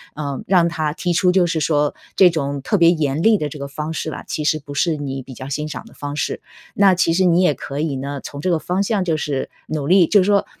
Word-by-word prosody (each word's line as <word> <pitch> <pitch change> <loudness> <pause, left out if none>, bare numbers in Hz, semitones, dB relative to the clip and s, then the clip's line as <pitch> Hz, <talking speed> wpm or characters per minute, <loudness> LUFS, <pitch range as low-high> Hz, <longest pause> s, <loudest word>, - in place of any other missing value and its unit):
呃， 145 -2 -4
让 175 -2 +4
他 155 -3 -2
提 175 +1 -2
出 180 +1 +3
就 180 -2 +3
是 160 -1 -1
说 150 -1 +1 0.2
这 185 - +7
种 140 -4 -3
特 205 +9 0
别 170 -2 +6
严 155 -2 -1
厉 220 -2 +5
的 150 -1 -2
这 150 - -9
个 140 - -5
方 150 +3 -5
式 155 - -3
吧， - - -7
其 150 - -3
实 155 +1 +1
不 145 0 -10
是 160 +2 +1
你 135 -2 -4
比 130 - -11
较 130 +3 -8
欣 150 +2 -3
赏 155 - -7
的 - - -16
方 145 0 -5
式。 150 - -2 0.3
那 195 -2 +5
其 175 -2 +2
实 185 +2 +2
你 175 0 +4
也 180 -5 +3
可 140 +1 -6
以 150 -3 -1
呢， 140 +1 -4
从 140 - -8
这 185 - -1
个 165 - +1
方 185 +5 -1
向 200 -2 0
就 165 -3 0
是 145 -3 -3 0.2
努 150 -3 -3
力， 185 0 +6
就 205 -2 +5
是 - - +1
说， 200 0 +3
155 Hz, 295 characters per minute, -20 LUFS, 145-180 Hz, 0.3 s, 这